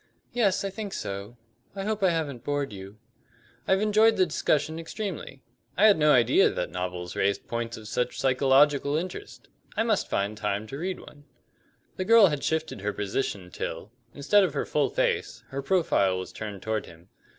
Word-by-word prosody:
"Yes, 200 Hz, -5 st, +1 dB
I 195 Hz, -, -2 dB
think 205 Hz, 0 st, -6 dB
so. 100 Hz, +4 st, -5 dB, 0.4 s
I 195 Hz, -, -4 dB
hope 215 Hz, 0 st, -2 dB
I 190 Hz, -, +4 dB
haven't 150 Hz, -8 st, -2 dB
bored 145 Hz, -4 st, -2 dB
you?" 100 Hz, +1 st, -10 dB, 0.7 s
"I've 190 Hz, +1 st, +3 dB
enjoyed 215 Hz, +1 st, +4 dB
the 185 Hz, -, +4 dB
discussion 155 Hz, 0 st, 0 dB
extremely. 165 Hz, -, -6 dB, 0.3 s
I 205 Hz, -, +5 dB
had 210 Hz, -2 st, +7 dB
no 150 Hz, 0 st, +5 dB
idea 120 Hz, -5 st, +5 dB
that -, -, -3 dB
novels 90 Hz, -1 st, -4 dB
raised 100 Hz, 0 st, 0 dB
points 115 Hz, 0 st, -3 dB
of 110 Hz, -1 st, -10 dB
such 125 Hz, +2 st, -2 dB
psychological 140 Hz, +2 st, +3 dB
interest. 185 Hz, -, -6 dB, 0.3 s
I -, -, +3 dB
must 220 Hz, -3 st, 0 dB
find 100 Hz, +2 st, -1 dB
time 105 Hz, 0 st, -2 dB
to 135 Hz, +6 st, -7 dB
read 185 Hz, +2 st, -3 dB
one." 145 Hz, 0 st, -15 dB, 0.7 s
The 185 Hz, -, -2 dB
girl 230 Hz, 0 st, +7 dB
had 145 Hz, -2 st, -3 dB
shifted 160 Hz, -9 st, -2 dB
her 105 Hz, +1 st, -2 dB
position 100 Hz, -3 st, -3 dB
till, 85 Hz, +6 st, -5 dB, 0.2 s
instead 170 Hz, -, +3 dB
of 165 Hz, -6 st, -1 dB
her -, -, -1 dB
full 150 Hz, -2 st, +1 dB
face, -, -, -1 dB
her 135 Hz, +1 st, -4 dB
profile 135 Hz, -, +2 dB
was 95 Hz, -, -6 dB
turned 105 Hz, -3 st, -7 dB
toward 110 Hz, 0 st, -2 dB
him. 85 Hz, +2 st, -16 dB
140 Hz, 180 wpm, -27 LUFS, -, 0.7 s, had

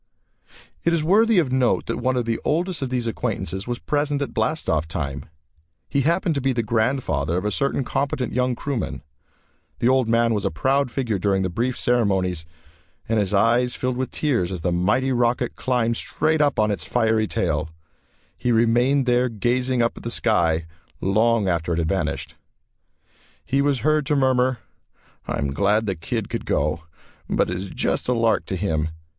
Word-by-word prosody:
It -, -, +2 dB
is 165 Hz, -2 st, +1 dB
worthy 215 Hz, +6 st, +4 dB
of 155 Hz, -8 st, +2 dB
note 130 Hz, -2 st, +2 dB
that -, -, -3 dB
one 130 Hz, 0 st, 0 dB
of 120 Hz, -, 0 dB
the 115 Hz, -1 st, -1 dB
oldest 170 Hz, +1 st, 0 dB
of 135 Hz, -, -2 dB
these 125 Hz, -2 st, -1 dB
acquaintances 95 Hz, -4 st, -3 dB
was 120 Hz, -1 st, -2 dB
present 145 Hz, +2 st, -1 dB
at -, -, -6 dB
blast 155 Hz, 0 st, -1 dB
off 80 Hz, 0 st, +1 dB
time. 70 Hz, -4 st, -4 dB, 0.6 s
He 140 Hz, -, 0 dB
happened 170 Hz, +4 st, +1 dB
to 140 Hz, -, -2 dB
be 135 Hz, 0 st, +1 dB
the 120 Hz, -1 st, 0 dB
grandfather 110 Hz, -, 0 dB
of 90 Hz, -, -2 dB
a 105 Hz, -, 0 dB
certain 140 Hz, +4 st, 0 dB
competent 135 Hz, 0 st, -2 dB
young 125 Hz, 0 st, +1 dB
crewman. 130 Hz, -5 st, -4 dB, 0.7 s
The 120 Hz, -, +2 dB
old 130 Hz, -3 st, +2 dB
man 115 Hz, 0 st, +3 dB
was 105 Hz, -3 st, -1 dB
a -, -, +1 dB
proud 135 Hz, -, +1 dB
figure 120 Hz, -6 st, -2 dB
during 95 Hz, 0 st, +1 dB
the 95 Hz, -, -2 dB
brief 120 Hz, +7 st, -1 dB
ceremonies 95 Hz, -8 st, +1 dB, 0.6 s
and 115 Hz, -1 st, +1 dB
his 100 Hz, -3 st, -1 dB
eyes 120 Hz, +4 st, +2 dB
filled 125 Hz, 0 st, -2 dB
with 130 Hz, +1 st, -2 dB
tears 120 Hz, -, 0 dB
as 90 Hz, -3 st, -4 dB
the 90 Hz, -, 0 dB
mighty 105 Hz, +10 st, +1 dB
rocket 120 Hz, 0 st, +1 dB
climbed 115 Hz, -2 st, 0 dB
straight 155 Hz, 0 st, 0 dB
up 145 Hz, -2 st, +2 dB
on 105 Hz, -1 st, +2 dB
its 100 Hz, -, -3 dB
fiery 110 Hz, -2 st, +1 dB
tail. 80 Hz, -5 st, -1 dB, 0.7 s
He 125 Hz, -, -1 dB
remained 120 Hz, +4 st, +3 dB
there 125 Hz, 0 st, +2 dB
gazing 120 Hz, +3 st, 0 dB
up 115 Hz, -, 0 dB
at -, -, -8 dB
the 115 Hz, -, -4 dB
sky 85 Hz, -9 st, +1 dB, 0.3 s
long 110 Hz, +2 st, +2 dB
after 85 Hz, -1 st, 0 dB
it -, -, -1 dB
had 80 Hz, -2 st, 0 dB
vanished. -, -, -2 dB, 1.1 s
He 135 Hz, +2 st, +1 dB
was 140 Hz, -4 st, +1 dB
heard 155 Hz, +1 st, +2 dB
to 150 Hz, -, +2 dB
murmur, 130 Hz, -2 st, +2 dB, 0.7 s
"I -, -, -2 dB
am 70 Hz, -1 st, -2 dB
glad 105 Hz, +6 st, +2 dB
the 100 Hz, -, 0 dB
kid 80 Hz, -, -4 dB
could -, -, -5 dB
go, 75 Hz, +3 st, 0 dB, 0.4 s
but -, -, +1 dB
it 90 Hz, -, -2 dB
is 95 Hz, +1 st, -6 dB
just -, -, -1 dB
a 125 Hz, -, +2 dB
lark 115 Hz, -1 st, +1 dB
to 95 Hz, -, -2 dB
him. 80 Hz, -4 st, -1 dB
120 Hz, 190 wpm, -23 LUFS, 95-130 Hz, 1.1 s, worthy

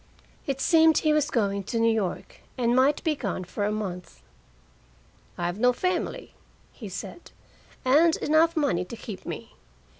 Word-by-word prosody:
It 275 Hz, -1 st, -2 dB
seemed 320 Hz, +2 st, +5 dB
he 310 Hz, -1 st, +2 dB
was 300 Hz, -1 st, +1 dB
going 200 Hz, -5 st, 0 dB
to 230 Hz, -, -3 dB
New 230 Hz, 0 st, +3 dB
York, 200 Hz, -5 st, -4 dB, 0.2 s
and 240 Hz, -1 st, +1 dB
might 270 Hz, +3 st, +3 dB
be 315 Hz, -2 st, +1 dB
gone 200 Hz, -8 st, -4 dB
for 200 Hz, +3 st, -3 dB
a 210 Hz, -, 0 dB
month. 190 Hz, -4 st, -6 dB, 1.1 s
"I've 175 Hz, +3 st, -3 dB
no 250 Hz, +1 st, +4 dB
family," 365 Hz, +6 st, -3 dB, 0.4 s
he 215 Hz, -5 st, -9 dB
said, 270 Hz, -, -8 dB, 0.6 s
"and 315 Hz, +6 st, +5 dB
enough 320 Hz, +2 st, +2 dB
money 275 Hz, -, +1 dB
to 205 Hz, +6 st, -9 dB
keep 210 Hz, -4 st, -9 dB
me. -, -, -7 dB
245 Hz, 155 wpm, -26 LUFS, 200-305 Hz, 1.1 s, seemed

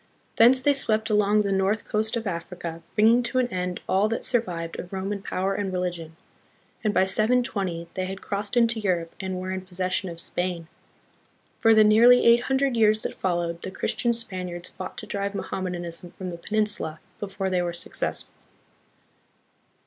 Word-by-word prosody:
Thence 250 Hz, +3 st, +6 dB
they 285 Hz, -, +4 dB
swept 220 Hz, -5 st, +1 dB
along 210 Hz, 0 st, +3 dB
the 200 Hz, -, -1 dB
north 195 Hz, +3 st, +1 dB
coast 220 Hz, +2 st, 0 dB
of 230 Hz, -, -4 dB
Africa, 170 Hz, -2 st, -5 dB
bringing 225 Hz, +3 st, +5 dB
to 245 Hz, +2 st, -2 dB
an 255 Hz, -1 st, +3 dB
end 180 Hz, -3 st, -3 dB
all 195 Hz, +3 st, +2 dB
that 230 Hz, -, -2 dB
survived 170 Hz, -8 st, 0 dB
of 175 Hz, -, -7 dB
Roman 195 Hz, +1 st, -3 dB
power 195 Hz, 0 st, -1 dB
and 195 Hz, -1 st, -2 dB
religion, 175 Hz, -3 st, -3 dB, 0.7 s
and 215 Hz, -, +2 dB
by 190 Hz, -, +3 dB
720 200 Hz, -5 st, 0 dB
they 185 Hz, -, -2 dB
had 190 Hz, 0 st, -6 dB
crossed 205 Hz, +4 st, -3 dB
into 230 Hz, -1 st, +3 dB
Europe 175 Hz, -5 st, -1 dB
and 190 Hz, -2 st, -3 dB
were 185 Hz, +1 st, -4 dB
in 190 Hz, 0 st, -3 dB
possession 185 Hz, 0 st, -2 dB
of 170 Hz, -1 st, -8 dB
Spain. 175 Hz, -1 st, -3 dB, 0.9 s
For 225 Hz, -1 st, +5 dB
the 215 Hz, -, +7 dB
nearly 235 Hz, +4 st, +6 dB
eight 235 Hz, +1 st, +6 dB
hundred 265 Hz, -1 st, +2 dB
years 215 Hz, -1 st, +3 dB
that -, -, -3 dB
followed, 170 Hz, -2 st, -2 dB
the -, -, -5 dB
Christian 235 Hz, +5 st, 0 dB
Spaniards 185 Hz, -7 st, -3 dB
fought -, -, -8 dB
to -, -, -5 dB
drive 200 Hz, 0 st, -3 dB
Mohammedanism 175 Hz, -3 st, -5 dB
from 185 Hz, -1 st, -5 dB
the 170 Hz, -, -6 dB
peninsula, 210 Hz, -5 st, -1 dB, 0.2 s
before 195 Hz, -1 st, -3 dB
they 180 Hz, -1 st, +2 dB
were 175 Hz, -1 st, -1 dB
successful. 170 Hz, -, -4 dB
195 Hz, 170 wpm, -25 LUFS, 180-220 Hz, 0.9 s, the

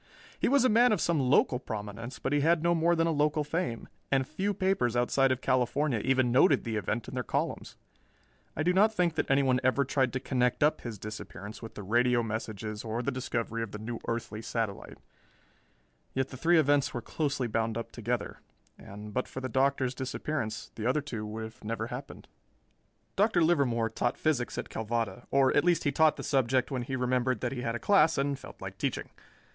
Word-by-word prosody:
He -, -, +2 dB
was 275 Hz, 0 st, +4 dB
a -, -, +7 dB
man 240 Hz, +2 st, +5 dB
of 210 Hz, -, +2 dB
some 170 Hz, -2 st, +1 dB
local 130 Hz, -1 st, +3 dB
prominence, 110 Hz, +3 st, -6 dB
but 135 Hz, +4 st, -2 dB
he 145 Hz, -, +3 dB
had 165 Hz, +2 st, +3 dB
no 170 Hz, 0 st, +3 dB
more 170 Hz, +1 st, +3 dB
than 165 Hz, 0 st, +2 dB
a 165 Hz, -, +1 dB
local 150 Hz, 0 st, +1 dB
fame, 155 Hz, -6 st, -3 dB, 0.2 s
and 135 Hz, -1 st, +3 dB
few 195 Hz, +6 st, -1 dB
papers 185 Hz, -, +1 dB
outside 130 Hz, +2 st, +3 dB
of 130 Hz, 0 st, -1 dB
California 130 Hz, 0 st, +1 dB
even 130 Hz, +1 st, +2 dB
noted 135 Hz, +9 st, +4 dB
the 115 Hz, -2 st, -3 dB
event 110 Hz, +3 st, -2 dB
in -, -, -8 dB
their 130 Hz, -, -1 dB
columns. -, -, -3 dB, 0.8 s
I 155 Hz, -, -1 dB
do 180 Hz, +2 st, +3 dB
not 210 Hz, +4 st, +5 dB
think 180 Hz, -6 st, +1 dB
that 160 Hz, -, -2 dB
anyone 135 Hz, -2 st, +3 dB
ever 130 Hz, +2 st, +2 dB
tried 130 Hz, -2 st, +1 dB
to 130 Hz, -, -1 dB
connect 125 Hz, 0 st, +1 dB
up 150 Hz, -, +2 dB
his 115 Hz, -3 st, -6 dB
disappearance 105 Hz, 0 st, -8 dB
with 115 Hz, -, -9 dB
the 105 Hz, -, -7 dB
radio 120 Hz, +4 st, +2 dB
messages 110 Hz, -1 st, -4 dB
or 115 Hz, +2 st, -3 dB
the 140 Hz, -, 0 dB
discovery 115 Hz, -3 st, -3 dB
of 115 Hz, -3 st, -5 dB
the -, -, -4 dB
new 115 Hz, +2 st, -5 dB
earthly 115 Hz, -2 st, -3 dB
satellite; 110 Hz, -2 st, -4 dB, 1.2 s
yet 130 Hz, 0 st, 0 dB
the -, -, -9 dB
three 165 Hz, +6 st, +3 dB
events 145 Hz, -3 st, +3 dB
were 120 Hz, -, -3 dB
closely 140 Hz, -4 st, -1 dB
bound 115 Hz, 0 st, -1 dB
up 115 Hz, -, -5 dB
together, 120 Hz, +1 st, -3 dB, 0.4 s
and 105 Hz, +1 st, -10 dB
but 130 Hz, -, -1 dB
for -, -, -6 dB
the 130 Hz, -, -3 dB
Doctor's 130 Hz, 0 st, +1 dB
disappearance, 130 Hz, -4 st, -4 dB
the 110 Hz, +1 st, -3 dB
other 135 Hz, +4 st, +2 dB
two 115 Hz, -7 st, -5 dB
would 110 Hz, +2 st, -7 dB
never 115 Hz, +1 st, -3 dB
have 120 Hz, -, -5 dB
happened. 135 Hz, +2 st, -10 dB, 0.9 s
Dr. 200 Hz, -4 st, +3 dB
Livermore 135 Hz, -9 st, +2 dB
taught 120 Hz, +2 st, -1 dB
physics 140 Hz, -6 st, 0 dB
at -, -, -4 dB
Calvada, 115 Hz, -1 st, -3 dB
or 135 Hz, -1 st, +3 dB
at -, -, +4 dB
least 175 Hz, -1 st, +2 dB
he 145 Hz, -, +1 dB
taught 155 Hz, +2 st, +4 dB
the -, -, -7 dB
subject 130 Hz, -1 st, +1 dB
when 130 Hz, -2 st, -1 dB
he 130 Hz, +2 st, -3 dB
remembered 125 Hz, 0 st, 0 dB
that 120 Hz, -, -1 dB
he 125 Hz, -, -4 dB
had 115 Hz, -1 st, -2 dB
a -, -, -3 dB
class 165 Hz, -6 st, +4 dB
and 140 Hz, 0 st, 0 dB
felt -, -, -12 dB
like -, -, -8 dB
teaching. -, -, -2 dB
130 Hz, 205 wpm, -29 LUFS, 115-145 Hz, 1.2 s, a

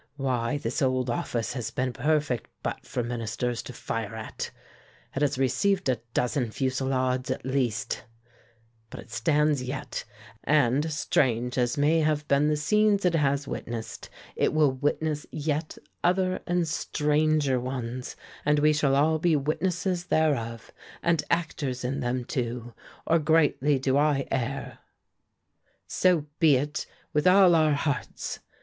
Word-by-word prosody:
Why, 130 Hz, -1 st, -1 dB
this 140 Hz, +3 st, -3 dB
old 130 Hz, -2 st, +1 dB
office 115 Hz, -1 st, -2 dB
has 120 Hz, -4 st, -3 dB
been 125 Hz, +2 st, -1 dB
a -, -, -4 dB
perfect 145 Hz, -, 0 dB
butt -, -, -4 dB
for 120 Hz, -, -2 dB
Ministers 120 Hz, 0 st, -2 dB
to -, -, -9 dB
fire 115 Hz, -2 st, -4 dB
at 110 Hz, -, -5 dB, 0.7 s
it 135 Hz, -, -1 dB
has 145 Hz, -3 st, +1 dB
received 190 Hz, -, +1 dB
a 125 Hz, -, +2 dB, 0.2 s
dozen 125 Hz, -1 st, 0 dB
fusillades, 130 Hz, 0 st, -1 dB
at 130 Hz, 0 st, -3 dB
least; 130 Hz, -5 st, -1 dB, 0.8 s
but -, -, -9 dB
it 120 Hz, -, -12 dB
stands 150 Hz, +4 st, +2 dB
yet, 130 Hz, +2 st, -4 dB, 0.4 s
and, 145 Hz, +1 st, +2 dB
strange 125 Hz, -5 st, +1 dB
as 125 Hz, 0 st, +1 dB
may 150 Hz, +3 st, +3 dB
have 150 Hz, -1 st, 0 dB
been 140 Hz, +1 st, +3 dB
the 150 Hz, 0 st, +2 dB
scenes 205 Hz, +6 st, +2 dB
it 180 Hz, -, +3 dB
has 140 Hz, -3 st, +1 dB
witnessed, 115 Hz, -2 st, -6 dB, 0.3 s
it -, -, +1 dB
will 150 Hz, -3 st, +4 dB
witness 150 Hz, +3 st, -1 dB
yet 155 Hz, +1 st, -2 dB, 0.3 s
other 185 Hz, +1 st, +2 dB
and 175 Hz, -1 st, +1 dB
stranger 150 Hz, -2 st, +1 dB
ones, 125 Hz, 0 st, -5 dB, 0.3 s
and 150 Hz, 0 st, +3 dB
we 150 Hz, +1 st, +4 dB
shall 145 Hz, -2 st, +2 dB
all 155 Hz, +3 st, +3 dB
be 165 Hz, 0 st, +3 dB
witnesses 175 Hz, +5 st, -1 dB
thereof, 125 Hz, -9 st, 0 dB, 0.3 s
and 170 Hz, -3 st, +2 dB
actors 140 Hz, -7 st, -1 dB
in 135 Hz, +3 st, -2 dB
them, 125 Hz, -1 st, -2 dB
too, 120 Hz, -1 st, -3 dB, 0.3 s
or 165 Hz, -, +3 dB
greatly 150 Hz, -2 st, +3 dB
do 130 Hz, +1 st, +1 dB
I 145 Hz, -2 st, +2 dB
err." 135 Hz, +2 st, -3 dB, 1.1 s
"So 180 Hz, -5 st, +2 dB
be 155 Hz, -4 st, +6 dB
it, 145 Hz, +4 st, -2 dB, 0.3 s
with 150 Hz, +3 st, +2 dB
all 185 Hz, -1 st, +7 dB
our 155 Hz, -2 st, +4 dB
hearts!" 140 Hz, -4 st, -3 dB
140 Hz, 145 wpm, -27 LUFS, 125-155 Hz, 1.1 s, all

